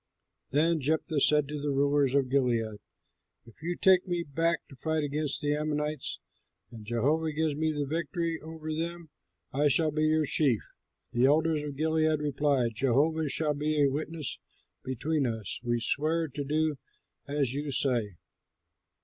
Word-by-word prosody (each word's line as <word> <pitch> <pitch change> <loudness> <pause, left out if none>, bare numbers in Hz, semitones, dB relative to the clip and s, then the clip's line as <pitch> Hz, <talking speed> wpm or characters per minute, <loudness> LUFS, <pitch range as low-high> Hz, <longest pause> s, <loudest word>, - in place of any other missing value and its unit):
Then 160 +3 +2
Jephthah 155 +2 0
said 150 0 +4
to 150 0 -5
the 145 - -1
rulers 140 -1 +2
of 140 -2 +3
Gilead, 120 -5 0 0.7
"If 115 +3 -18
you 175 +2 -2
take 185 0 +4
me 175 -1 -1
back 165 +2 -1
to 135 - -12
fight 160 +3 -1
against 145 0 -2
the 145 0 +2
Ammonites 150 -1 -2 0.5
and 115 -3 -10
Jehovah 140 +9 0
gives 155 0 0
me 155 +2 0
the 145 -1 -2
victory 165 +2 -2
over 155 0 -6
them, 165 0 -4 0.4
I 145 +2 +3
shall 155 +2 +3
be 155 +1 +1
your 155 0 +2
chief." 135 -7 +2 0.5
The 120 +2 +3
elders 155 +1 +3
of 145 -1 -5
Gilead 155 0 +2
replied, 140 -5 +1
"Jehovah 145 +6 +1
shall 150 +1 0
be 150 +1 -1
a 140 -2 +4
witness 155 0 -4 0.4
between 135 +3 -1
us; 110 -4 -3
we 120 -1 0
swear 160 +7 0
to 145 +2 -4
do 150 0 0 0.5
as 140 -3 0
you 145 +1 -3
say." 120 -8 +1
150 Hz, 160 wpm, -29 LUFS, 135-160 Hz, 0.7 s, said